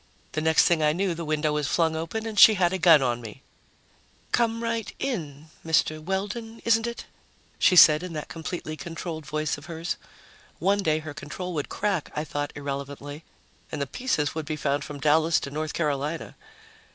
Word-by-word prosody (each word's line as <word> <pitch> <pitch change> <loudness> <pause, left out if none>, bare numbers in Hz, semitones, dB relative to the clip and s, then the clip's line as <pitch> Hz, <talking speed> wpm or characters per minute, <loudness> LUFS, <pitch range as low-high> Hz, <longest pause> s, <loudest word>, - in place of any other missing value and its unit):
The 155 - -2
next 160 0 +4
thing 170 -2 +3
I 150 0 +3
knew, 185 +1 0
the 170 0 -5
window 155 -1 0
was 150 -2 -1
flung 160 0 +1
up 165 +5 -5
and 220 -2 -2
she 220 - +9
had 180 -2 +2
a 190 - -1
gun 160 -4 +7
on 120 -1 0
me. 115 +4 -10 0.9
"Come 230 -1 +1
right 230 -1 -2
in 155 - -4
Mr. 155 -1 +1
Weldon, 205 +5 -4
isn't 225 0 +3
it?" 235 - -6 0.5
she 185 - +5
said 155 -3 +8
in 180 -2 -6
that 150 -1 -5
completely 160 -1 -5
controlled 165 -1 -6
voice 155 -1 -2
of 145 - -14
hers. 165 0 -4 0.6
One 200 +3 +2
day 155 -6 +2
her 155 -1 -6
control 180 +4 -6
would 145 -3 -3
crack, 195 -7 -1
I 150 - -1
thought 145 -1 -3
irrelevantly, 145 +1 -6 0.5
and 150 - -4
the 140 - 0
pieces 150 - -1
would 155 -2 -5
be 155 - -2
found 145 -1 -1
from 145 -1 -8
Dallas 155 +3 +3
to 140 - -6
North 155 +1 -3
Carolina. 150 0 -2
160 Hz, 190 wpm, -26 LUFS, 150-185 Hz, 0.9 s, she